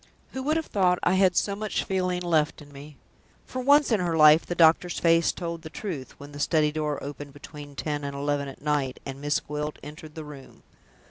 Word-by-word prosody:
"Who 265 - -5
would 305 +4 +1
have 320 - -2
thought 180 -3 +2
I 180 - +3
had 190 -1 +3
so 200 +2 +1
much 210 0 -2
feeling 180 -2 -1
left 160 -3 +1
in 145 -1 -14
me?" 145 +1 -12 0.5
For 255 - -6
once 285 +1 +4
in 220 - +3
her 170 -2 0
life 155 +1 +7
the 175 - -3
doctor's 170 +1 +4
face 165 -1 +3
told 170 -2 -5
the 160 - -9
truth, 160 -7 -7
when 145 +1 -10
the 145 - -9
study 150 0 +2
door 150 -1 -2
opened 145 0 -8
between 145 0 -11
ten 145 -1 -3
and 140 0 -4
eleven 145 0 -1
at 135 - -11
night, 145 -3 -1
and 135 0 -7
Miss 145 +1 +1
Gwilt 150 +1 -5
entered 150 +1 -10
the 160 -1 -7
room. 145 -3 -13
155 Hz, 215 wpm, -26 LUFS, 145-180 Hz, 0.5 s, life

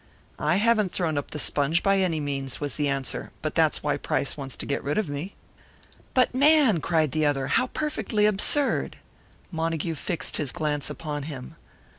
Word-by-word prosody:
"I - - +2
haven't 215 -2 +3
thrown 165 -4 -1
up 145 - -3
the - - -6
sponge, 150 +3 +3
by 195 0 +3
any 175 -4 +1
means," 140 -2 -3
was 145 -3 -2
the 150 -1 -1
answer. 135 -2 -3
"But - - -2
that's - - +2
why - - +1
Price 140 - -1
wants 135 -2 -5
to - - -3
get 140 - -2
rid 145 - -1
of 215 -4 +1
me." 150 +8 -5 0.8
"But, 255 -1 +3
man!" 275 - +5
cried 155 -4 +1
the 155 -1 +1
other. 135 -2 0
"How 255 - +2
perfectly 250 -8 0
absurd!" 215 +8 +1 0.5
Montague 165 -1 -1
fixed 170 +3 -2
his 145 -5 +1
glance 150 -2 -2
upon 150 -2 -4
him. 130 -4 -8
160 Hz, 180 wpm, -26 LUFS, 145-200 Hz, 0.8 s, man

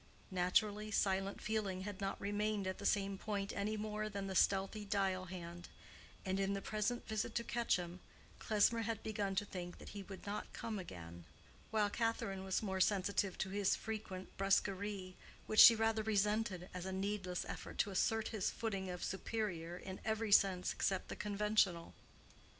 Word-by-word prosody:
Naturally, 205 +4 +2
silent 195 -1 +1
feeling 205 -4 -1
had 205 0 -6
not 195 0 -2
remained 205 0 0
at 185 0 -3
the 200 - 0
same 195 -1 +1
point 200 -2 -2
any 210 +2 -1
more 215 0 -2
than 200 -1 -4
the 195 - -3
stealthly 195 +2 +2
dial 195 -3 0
hand, 175 -1 -7 0.6
and 190 0 0
in 195 0 +1
the - - -1
present 215 +3 -1
visit 220 +1 -2
to 235 - +1
Quetcham, 185 -7 0 0.4
Klesmer 220 +2 +3
had 225 -1 -2
begun 205 -3 -1
to 205 - +1
think 175 -3 -6
that - - -10
he 205 - -6
would 195 0 -9
not 205 +1 -4
come 220 -3 -4
again; 85 - -8 0.4
while 210 -2 +2
Catherine 215 -5 -1
was 190 +2 0
more 190 -2 -1
sensitive 195 -1 +2
to 190 - -2
his 200 -1 +2
frequent 210 -4 -6
brusquerie, 195 -1 +1 0.3
which 215 - +1
she 230 - +12
rather 225 0 +2
resented 210 -3 +1
as 180 0 -4
a - - -3
needless 190 -1 -2
effort - - -6
to 205 - +1
assert 220 +3 +1
his 215 -4 0
footing 195 -4 -3
of 180 -1 -5
superior 185 -4 -2
in 190 +1 -7
every 220 -1 -1
sense 190 -2 +5
except 190 -2 -1
the - - -4
conventional. 205 -4 +1
200 Hz, 170 wpm, -37 LUFS, 190-215 Hz, 0.6 s, she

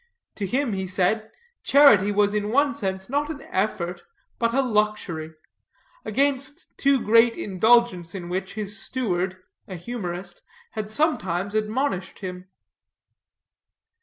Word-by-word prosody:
To 200 - -2
him, 255 +2 0
he 190 -1 -3
said, 205 +4 0 0.3
charity 245 -9 +6
was 205 0 +2
in 210 0 -1
one 280 +4 +3
sense 190 -7 -3
not 290 +3 -1
an 290 -3 -6
effort, 180 -3 -1 0.4
but 230 -1 +2
a 270 +3 +2
luxury; 210 -9 -1 0.7
against 280 +3 -1
too 275 -1 +3
great 230 +1 +4
indulgence 200 -3 +2
in 175 -2 -6
which 190 +2 -4
his 210 0 -3
steward, 185 -7 -2 0.3
a 185 - -6
humorist, 180 -2 -6 0.3
had 215 -1 -5
sometimes 205 - 0
admonished 215 -2 -1
him. 180 -1 -7
210 Hz, 125 wpm, -24 LUFS, 185-245 Hz, 0.7 s, charity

